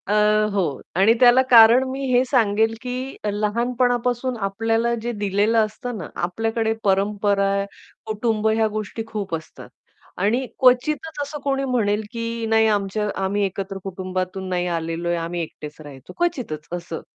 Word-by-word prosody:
अ, 205 - 0 0.4
हो. 180 -8 -1
आणि 195 +5 +5
त्याला 245 +1 +7
कारण 235 +1 +8
मी 270 +1 -4
हे 245 +1 +5
सांगेल, 225 -3 +2
की 255 +1 -5 0.2
लहानपणापासून 245 +3 0
आपल्याला 225 +3 0
जे 240 +2 -2
दिलेलं 205 +1 +1
असतं 245 +2 -6
ना, 165 - -6
आपल्याकडे 225 +5 -1
परंपरा, 200 0 +1 0.4
कुटुंब 220 0 -1
या 220 -1 +3
गोष्टी 215 +1 -4
खूप 200 -6 -3
असतात. 160 -1 -10 0.5
आणि 225 +8 +1
क्वचितच 290 +5 +2
असं 290 +1 -5
कोणी 275 -1 0
म्हणेल 220 -5 +1
की 230 -1 -4
नाही 220 0 +4
आमच्या 210 0 0
आम्ही 200 +2 0
एकत्र 195 0 -4
कुटुंबातून 185 0 -4
नाही 180 -1 -1
आलेलोय, 170 0 -2
आम्ही 170 +1 -3
एकटेच 150 -2 -8
राहायचो 140 -4 -12
क्वचितच 240 - -2
असं. 170 -1 -7
215 Hz, 140 wpm, -22 LUFS, 190-240 Hz, 0.5 s, कारण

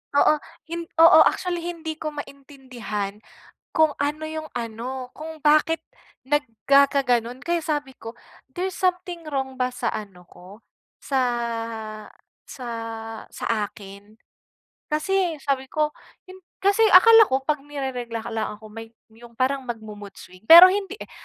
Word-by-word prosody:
Oo, 295 - +5 0.4
hin 335 0 -5 0.2
oo. 330 -1 +8
Actually, 355 -2 -2
hindi 330 -2 -6
ko 305 -1 -5
maintindihan 255 -8 -7 0.5
kung 315 -2 +2
ano 300 +2 -2
yung 315 0 -6
ano, 245 +3 -5
kung 320 +1 -9
bakit 305 +2 +3 0.5
nagkakaganon. 265 -2 +2
Kaya 340 -1 -1
sabi 295 -4 -3
ko, 225 0 -10 0.3
there's 370 +7 -4
something 360 -2 -2
wrong 265 -1 -3
ba 255 -1 -1
sa 250 - -5
ano 190 -4 -8
ko 185 +5 -15 0.4
sa 270 -2 -1 1.3
sa 255 - -9 0.6
sa - - -8 0.3
akin? 205 +2 -14 0.7
Kasi 345 -1 0
sabi 270 -2 -1
ko 305 -1 +1 0.4
'yon. 370 - -11 0.3
Kasi 400 +1 +2 0.2
akala 450 +4 +9
ko, 265 -3 -1
pag 300 +1 -1
ni-reregla, 265 -5 -5
akala 220 -2 -4
ko 215 +1 -14
may 225 +1 -9 0.2
yung 235 +1 -16
parang 265 +1 -1
magmo-mood 215 -4 -8
swing, 185 +4 -15
pero 345 +3 +11
hindi 400 0 -3
eh. - - -11
275 Hz, 135 wpm, -23 LUFS, 230-320 Hz, 1.3 s, pero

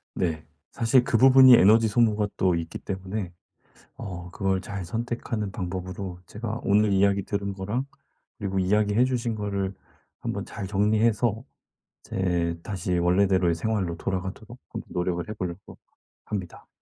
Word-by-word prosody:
네. 80 -4 -2 0.3
사실 120 +2 +3
그 115 - +1
부분이 130 0 +8
에너지 110 +2 +6
소모가 105 -2 +2
또 90 -2 +2
있기 85 0 -4
때문에 95 0 -5 0.6
어 90 -2 -7
그걸 95 -1 0
잘 95 -1 -6
선택하는 115 0 -3
방법으로 95 0 -5
제가 110 +1 -5
오늘 105 +1 +3
이야기 100 0 +3
들은 100 0 -3
거랑 100 +8 -3 0.5
그리고 95 -3 -2
이야기 105 +2 +2
해 120 +3 +5
주신 120 -3 -1
거를 100 -2 -2 0.5
한번 - - -4
잘 100 - -6
정리해서 110 +3 +1 0.6
제 85 -3 -1
다시 90 -4 -2
원래대로의 90 0 +3
생활로 95 -1 -1
돌아가도록 95 +6 -5
한번 - - -7
노력을 90 -1 -1
해 - - -3
보려고 90 0 -7 0.5
합니다. 95 -5 -6
100 Hz, 315 characters per minute, -26 LUFS, 90-110 Hz, 0.6 s, 부분이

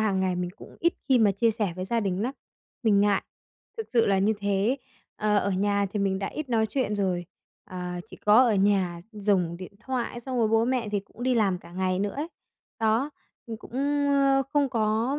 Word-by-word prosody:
hàng 200 -3 +1
ngày 185 -1 0
mình 180 0 -2
cũng - - -13
ít 340 +1 +3 0.2
khi 260 -2 +5
mà 210 -3 +4
chia 230 +4 +2
sẻ 210 -5 -1
với 185 - -3
gia 230 +4 0
đình 195 -1 -1
nắm, 255 +3 -1 0.5
mình 210 -3 +4
ngại, 205 -1 +3 0.5
thực 450 - -4
sự 230 -2 +4
là 195 -1 +3
như 200 +3 +3
thế. 200 +6 +1 0.4
Ờ, 210 0 +1
ở 200 - 0
nhà 200 +1 +1
thì 210 - -1
mình 195 -1 +1
đã 195 - -2
ít 305 -3 -5
nói 225 -2 +2
chuyện 220 -3 -1
rồi, 180 -3 0 0.4
ờ, 180 -3 -5
chỉ - - -10
có 215 +5 +5
ở 230 - +3
nhà 190 -3 +2
dùng 195 -5 0
điện 185 0 -9
thoại 245 -1 -3
xong 255 +1 -3
rồi 225 -2 +3
bố 225 +1 +3
mẹ 245 -3 0
thì 205 -1 -1
cũng 200 +4 -13
đi 255 0 +2
làm 195 -6 +2
cả 175 - -15
ngày 185 0 0
nữa 200 +1 -1
ấy. 300 +3 -3 0.5
Đó, 225 +6 +2 0.4
mình 225 -2 -5
cũng, - - -14 0.4
ờ, 275 -1 +4
không 285 -2 +3
có, 225 +3 0
210 Hz, 220 wpm, -27 LUFS, 195-240 Hz, 0.5 s, khi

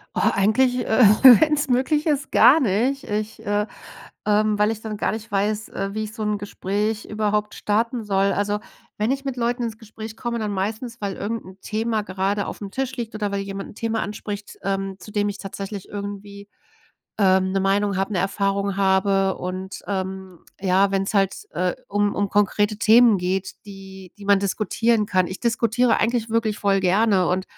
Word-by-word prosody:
Oh, - - 0
eigentlich, 235 +6 +2
äh, 225 +2 +4 0.4
wenn's 300 -2 +2
möglich 265 +5 +1
ist, 295 -3 0
gar 310 +5 +7
nicht. 255 +4 0
Ich, 210 +1 -4
äh, 205 0 0 0.6
ähm 210 0 +2
weil 210 +1 +3
ich 225 -1 -4
dann 220 -1 -5
gar - - 0
nicht 220 +1 -7
weiß, 210 +2 -1
äh, 195 +1 -4
wie 215 0 -2
ich 215 0 -8
so 220 - -5
'n 210 -1 0
Gespräch 205 +2 -2
überhaupt 210 0 -1
starten 230 +3 -1
soll. 195 -1 +1
Also, 205 +1 -1 0.4
wenn 215 +3 0
ich 270 +1 -2
mit 270 -2 -3
Leuten 240 0 -1
ins 225 -1 -5
Gespräch 220 0 -9
komme, 235 0 -3
dann 215 -2 -2
meistens, 220 +5 -4
weil 200 -2 -3
irgendein 205 -3 -5
Thema 220 +1 -1
gerade 195 +1 -1
aufm 200 -2 -7
Tisch 265 +4 -3
liegt 230 -3 -5
oder 205 -2 -2
weil 200 - -1
jemand 195 0 -6
'n - - -15
Thema 225 +1 -2
anspricht, 205 0 -6
ähm, 195 0 -2
zu - - -11
dem 205 0 0
ich 200 -1 -5
tatsächlich 195 0 -7
irgendwie, 200 0 -7 0.7
ähm, 190 -2 +3
'ne 195 - +1
Meinung 200 +1 +1
habe, 195 +2 -1
'ne 190 - 0
Erfahrung 195 0 -1
habe. 195 0 +2
Und, 185 +1 -6
ähm, 190 -2 -4 0.2
ja, 190 +1 +3
wenn's 195 0 0
halt, 195 - 0
äh, 180 0 0
um 205 0 +1
um 200 0 0
konkrete 205 +1 +1
Themen 225 0 +6
geht, 185 +1 -2
die 195 -2 -11
die 205 - -11
man 200 -1 +5
diskutieren 215 +3 +1
kann. 185 -2 +1
Ich 185 - -6
diskutiere 235 +1 +2
eigentlich 230 0 0
wirklich 220 -2 0
voll 200 -1 +2
gerne 190 0 +3
und, 185 +1 0
205 Hz, 185 wpm, -23 LUFS, 195-220 Hz, 0.7 s, gar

